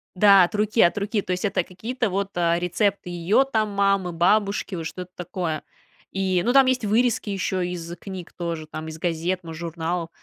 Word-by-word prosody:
Да, 195 -1 +7
от 175 - -1
руки, 215 +2 +2
от 175 - +4
руки. 205 +1 -1
То 185 - -5
есть, 180 - -3
это 200 - +1
какие-то 225 +4 -3
вот, 195 +1 -1
а, 170 0 +2
рецепты 180 +2 0
ее 175 +9 +2
там 215 -1 +1
мамы, 195 -3 +1
бабушки, 200 +3 +1
вот 165 -2 -5
что-то 180 +2 -7
такое. 175 -3 -3 0.5
И, 190 -2 +1
ну, 245 - +2
там 270 -1 +7
есть 255 -3 +1
вырезки 225 0 +1
еще 185 -2 -1
из 170 -1 -6
книг 190 -3 -8
тоже, 170 -3 -4
там 155 0 -7
из 160 - -7
газет, 175 +2 -1
мож 160 -1 -8
журналов. 170 0 -3
185 Hz, 195 wpm, -24 LUFS, 170-205 Hz, 0.5 s, Да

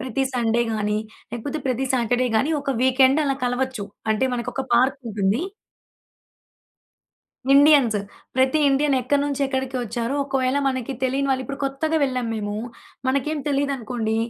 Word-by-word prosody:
ప్రతి 260 +1 -2
సండే 235 -1 +1
గానీ, 210 -1 0 0.3
లేపోతే 280 +6 -4
ప్రతి 260 +1 0
సాటర్‌డే 245 +1 +1
గానీ, 270 +8 +2
ఒక 275 - -2
వీకెండ్ 260 +3 +4
అలా 275 -1 0
కలవచ్చు. 245 -3 -1 0.3
అంటే 220 +4 +2
మనకొక 245 +3 -3
పార్కుంటుంది. 235 -4 +1 2.1
ఇండియన్స్ 280 -6 +6 0.4
ప్రతి 260 +3 +3
ఇండియన్ 280 +1 +2
ఎక్కడి 280 +3 +1
నుంచెక్కడికొచ్చారో, 265 -3 -2
ఒకవేళ 270 -1 0
మనకి 260 -1 -1
తెలీని 270 +2 0
వాళ్ళు 260 -1 +1
ఇప్పుడు 275 0 -6
కొత్తగా 290 +4 -1
వెళ్ళాం 255 -3 0
మేము. 205 -1 -3 0.5
మనకేం 280 +3 0
తెలీదనుకోండి 250 -5 -1
260 Hz, 120 wpm, -23 LUFS, 235-275 Hz, 2.1 s, ఇండియన్స్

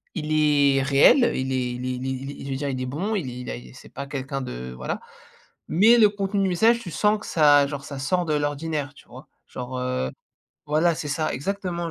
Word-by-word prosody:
il 155 -2 -2
est 145 -3 +4
réel, 140 - +5
heu, - - +1
il 130 0 -2
est 125 -1 -1
il 125 +1 -5
est 130 - -1
il 125 +1 -5
est - - -1
il 135 +2 -6
est - - -8
je - - -6
veux - - -1
dire, 145 0 -3
il 130 -1 -3
est - - -2
bon 180 +12 -2
il 150 -10 -2
est 125 +1 -7 0.2
il 60 - -14
a - - -17
c'est - - -14
pas 140 - -5
quelqu'un 135 0 -4
de, 65 - -6
voilà, 65 - -4 0.7
mais 225 +8 +5
le 215 - +7
contenu 200 0 -2
du 190 - +1
message 225 +7 +4
tu 195 -7 -8
sens 210 0 +2
que - - -10
ça, 145 -3 +5
genre 140 -1 -6
ça 140 -2 -7
sort 175 +7 0
de 155 - 0
l'ordinaire, 145 0 -2
tu - - -19
vois? 130 +5 -12 0.2
Genre, 125 0 -6
heu, 125 - -2 0.6
voilà, 155 +3 +2
c'est 150 - -5
ça, 155 +2 -1
exactement 175 +2 -3
145 Hz, 245 wpm, -24 LUFS, 130-175 Hz, 0.7 s, le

